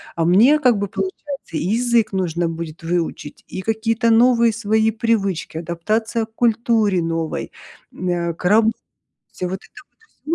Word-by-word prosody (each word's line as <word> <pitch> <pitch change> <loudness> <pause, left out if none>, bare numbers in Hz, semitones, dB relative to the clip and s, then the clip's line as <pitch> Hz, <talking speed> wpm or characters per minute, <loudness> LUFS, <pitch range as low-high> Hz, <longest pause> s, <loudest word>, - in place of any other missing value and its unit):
а 165 - 0
мне 220 - +5
как 250 -6 +3
бы 200 - -1
получается 375 - -4 0.4
и - - -2
язык 230 +1 +1
нужно 175 -3 -1
будет 165 -1 -7
выучить, 165 -3 -3
и 185 - -6
какие-то 225 +2 0
новые 235 0 +4
свои 220 0 +1
привычки, 205 -7 -1
адаптация 215 +8 -2
к 220 - -31
культуре 225 -5 +2
новой, 165 -1 -3 0.4
м, 185 - -4
э, 170 -1 -1
к 180 - -10
работе- 220 +4 +4 0.7
вот 180 0 -2
это - - -14 0.5
вот 320 - 0
210 Hz, 150 wpm, -20 LUFS, 175-230 Hz, 0.7 s, мне